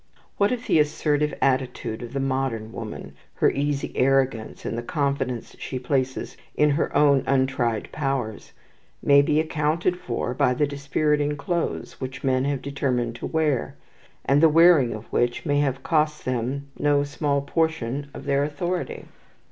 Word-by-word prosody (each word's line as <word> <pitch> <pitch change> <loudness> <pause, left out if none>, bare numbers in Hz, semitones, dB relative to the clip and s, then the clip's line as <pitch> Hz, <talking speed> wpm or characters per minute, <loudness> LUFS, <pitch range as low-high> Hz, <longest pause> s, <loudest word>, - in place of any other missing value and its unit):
What 200 +2 +3
if 250 -1 -3
the - - +3
assertive 150 0 +1
attitude 130 -4 0
of 120 +1 -8
the 140 - -1
modern 130 -5 -1
woman, 110 -2 -7 0.2
her - - +3
easy 140 0 -1
arrogance, 130 -4 +1
and - - -2
the 120 - -2
confidence 135 -3 -2
she 130 - -4
places 130 0 -2 0.2
in 150 0 +4
her 145 +3 0
own 140 -2 +5
untried 130 -4 0
powers, 135 -7 -3 0.5
may 140 0 +6
be 150 +2 +2
accounted 160 +3 0
for 120 -3 -3
by 125 0 +2
the 150 - +2
dispiriting 145 +1 0
clothes 170 +1 -3
which 130 0 -6
men 130 -1 +2
have 140 -2 -1
determined 125 -4 -1
to - - -5
wear, 155 -6 0 0.5
and 140 +2 +3
the 165 - +7
wearing 155 -7 +5
of 110 +1 -9
which 120 +5 0
may 145 -2 +2
have 135 -2 0
cost 150 -1 +1
them 130 +3 -2
no 145 -1 +3
small 145 -1 -1
portion 145 -3 -1
of 135 - -10
their 140 0 +2
authority? 175 +5 -3
140 Hz, 155 wpm, -24 LUFS, 130-150 Hz, 0.5 s, the